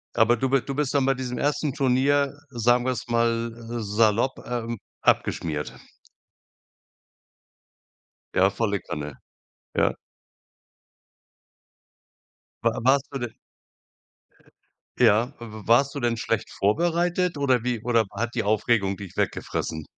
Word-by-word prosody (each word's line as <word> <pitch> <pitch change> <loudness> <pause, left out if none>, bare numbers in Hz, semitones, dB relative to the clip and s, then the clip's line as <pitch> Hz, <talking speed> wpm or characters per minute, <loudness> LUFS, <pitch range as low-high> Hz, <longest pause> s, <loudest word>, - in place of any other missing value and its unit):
Aber 120 +1 +4
du 130 +2 0
bi 135 -2 +3
du 140 - -5
bist 145 -2 0
dann 140 -2 +3
bei 135 - +3
diesem 125 -1 -4
1. 145 -1 0
Turnier, 140 +1 +2 0.2
sagen 120 0 +2
wir's 130 -1 -2
mal, 115 0 +1
äh, 115 0 -6
salopp, 110 +4 +2
ähm, 115 -2 -3 0.2
abgeschmiert? 75 -2 0 2.6
Ja, 95 +1 +5
volle 100 -1 -1
Kanne. 75 -3 -6 0.6
Ja. - - +3 2.7
Wa - - +1
warst 135 +2 +3
du 135 - -4
denn 120 -2 -4 1.6
ja, 115 +2 +4
w 120 - -8 0.2
w - - -16
warst 135 +4 +4
du - - -2
denn 120 -2 0
schlecht 115 -1 -1
vorbereitet 170 - +1
oder 130 -4 +2
wie 125 -2 -1
oder 115 -3 +3
hat 120 +1 -2
die - - 0
Aufregung 105 -2 +1
dich 100 -4 -9
weggefressen? 80 -1 -2
120 Hz, 125 wpm, -25 LUFS, 110-135 Hz, 2.7 s, Ja